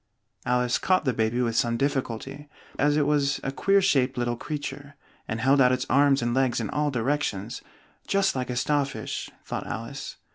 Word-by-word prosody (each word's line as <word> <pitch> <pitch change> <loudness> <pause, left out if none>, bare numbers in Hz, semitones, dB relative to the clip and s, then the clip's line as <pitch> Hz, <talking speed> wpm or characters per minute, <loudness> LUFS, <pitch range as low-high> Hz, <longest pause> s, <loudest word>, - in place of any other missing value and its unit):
Alice 125 0 +2
caught 185 -4 +2
the 130 - +2
baby 115 +2 0
with 115 -2 -1
some 115 0 +1
difficulty, 135 +1 -3 0.3
as 145 0 +3
it 150 - +3
was 145 -2 +1
a 135 - -2
queer 195 +7 +2
shaped 135 -7 +2
little 120 -1 0
creature, 145 +1 -6 0.3
and 110 - -3
held 135 +3 +4
out 125 -1 +5
its 130 0 0
arms 140 -1 +4
and 120 0 0
legs 130 -2 +1
in 110 - -3
all 150 0 0
directions, 120 -5 -2 0.5
"just 195 -4 +2
like 130 -1 -2
a 125 - -2
star 145 +3 +2
fish," 135 0 -5 0.2
thought - - -4
Alice. - - -6
135 Hz, 185 wpm, -26 LUFS, 120-145 Hz, 0.5 s, out